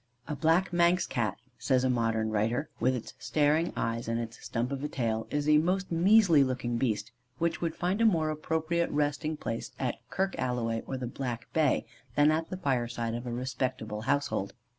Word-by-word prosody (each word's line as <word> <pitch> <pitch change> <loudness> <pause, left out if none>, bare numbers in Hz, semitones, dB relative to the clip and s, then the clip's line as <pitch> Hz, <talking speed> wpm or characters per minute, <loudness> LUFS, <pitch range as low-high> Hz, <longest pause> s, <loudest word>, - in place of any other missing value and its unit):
"A 150 - -2
black 165 +5 +2
Manx 175 +1 +4
Cat," 110 -4 -1 0.2
says 130 -2 +2
a 130 - +2
modern 115 -2 0
writer, 115 +7 0
"with 130 +2 +2
its 120 - -6
staring 155 +2 +2
eyes 115 0 -1
and 115 0 0
its 115 +1 -6
stump 120 +2 -2
of 140 0 -3
a - - 0
tail, 115 -6 -2
is 145 0 -1
a 150 0 +6
most 185 +3 0
measly 175 -3 +6
looking 125 -2 -1
beast, 115 -2 -1 0.3
which 170 -1 -1
would 165 -1 -1
find 185 +5 0
a - - +5
more 160 -6 +2
appropriate 160 +2 -1
resting 150 +1 -1
place 115 -4 -4
at 125 -3 -2
Kirk 190 +1 0
Alloway 115 -2 -1
or 135 - -3
the 130 - -4
Black 120 -1 -5
Bay, 155 -4 +2 0.3
than 145 +1 +5
at 160 +1 -1
the 185 - -4
fireside 120 -6 -1
of 120 +1 -4
a - - -3
respectable 125 -3 -3
household. 135 -6 -1
135 Hz, 190 wpm, -29 LUFS, 120-160 Hz, 0.3 s, a